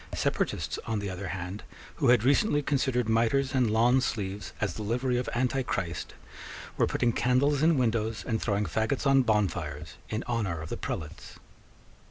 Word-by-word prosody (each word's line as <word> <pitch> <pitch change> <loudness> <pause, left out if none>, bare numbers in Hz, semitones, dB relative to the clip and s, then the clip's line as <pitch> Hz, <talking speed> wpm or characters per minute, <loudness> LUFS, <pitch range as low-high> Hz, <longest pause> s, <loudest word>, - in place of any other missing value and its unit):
Separatists, - - -1
on 110 - -1
the 100 -1 -3
other 95 +1 -5
hand, 90 +3 -5 0.4
who 140 - +1
had 120 -2 +5
recently 145 - +3
considered 130 -4 0
mitres 120 +4 +2
and 125 -4 +2
lawn 120 +4 +4
sleeves 100 -4 -3
as 100 -5 -1
the 110 - -6
livery 125 +4 0
of 125 - -3
Antichrist, 120 - -2 0.6
were - - +2
putting 120 -1 +1
candles 135 +4 +2
in 160 -1 +4
windows 115 -3 0
and 110 -2 -1
throwing 105 -1 0
faggots 110 - -1
on 135 -1 +5
bonfires 85 - -1
in 110 +2 -2
honour 110 -9 -2
of 80 +1 -7
the - - -3
prelates. 75 -2 -6
115 Hz, 165 wpm, -28 LUFS, 100-130 Hz, 0.6 s, had